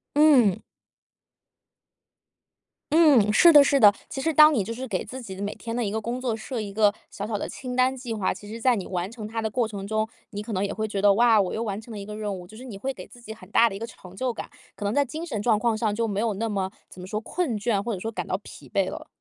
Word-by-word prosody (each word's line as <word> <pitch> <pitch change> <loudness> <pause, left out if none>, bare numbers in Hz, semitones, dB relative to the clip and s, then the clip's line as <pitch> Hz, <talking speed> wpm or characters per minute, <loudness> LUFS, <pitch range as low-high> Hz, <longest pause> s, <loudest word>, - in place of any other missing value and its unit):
嗯。 275 -10 +6 2.4
嗯， 285 -10 +5
是 340 +10 +8
的 295 -3 +9
是 280 0 +3
的。 210 -4 +8 0.2
其 270 - -4
实 325 - +1
当 305 0 +7
你 225 -8 +1
就 215 - -6
是 255 +3 -6
给 190 -6 -2
自 255 +5 -8
己 195 -6 -8
的 190 - -8
每 205 0 -3
天 230 0 -6
的 245 - 0
一 205 - -1
个 220 +2 -2
工 235 +3 -4
作 245 -3 -1
设 225 +2 -5
一 205 -2 -6
个 205 0 +3 0.2
小 205 - -6
小 215 0 -3
的 - - -4
清 250 -1 -6
单 255 +1 +3
计 245 -2 -5
划， 210 -4 0
其 205 - -12
实 225 +2 -8
在 250 0 +4
你 195 - -4
完 180 +1 -3
成 225 -3 -7
它 225 +1 -3
的 220 - -1
过 235 +1 0
程 200 -2 -7
中， 215 +1 0 0.2
你 205 -1 -6
可 220 0 -6
能 190 0 0
也 200 - -1
会 220 +1 -2
觉 200 -2 -3
得： 205 0 +6
“哇， 230 -1 +5
我 185 - -2
又 225 - -2
完 205 -1 -4
成 230 - -13
了 215 - -6
一 200 - -7
个 210 +1 -7
任 210 -2 -3
务。” 180 - -10
就 215 - -14
是 240 - -10
你 235 -6 -8
会 265 +7 -3
给 - - -10
自 245 - -16
己 220 -2 -8
很 190 -4 -15
大 230 +3 +5
的 195 - -7
一 - - -7
个 230 - -5
成 185 -5 -14
就 255 +5 -1
感， - - -7 0.3
可 205 - -6
能 200 - 0
在 285 - +3
精 310 +5 -6
神 225 -11 -3
状 220 0 +3
况 230 +1 +1
上， 215 -1 -1
就 230 +1 0
没 200 -2 -2
有 220 -2 0
那 225 +4 -2
么 195 -3 -2 0.2
怎 180 - -12
么 180 - -8
说， 210 +2 -2
困 275 -2 -2
倦 210 -1 0
或 235 - -3
者 200 - -3
说 225 +4 -4
感 - - -5
到 - - -1
疲 - - -12
惫 - - +1
了。 - - -8
220 Hz, 320 characters per minute, -25 LUFS, 205-245 Hz, 2.4 s, 的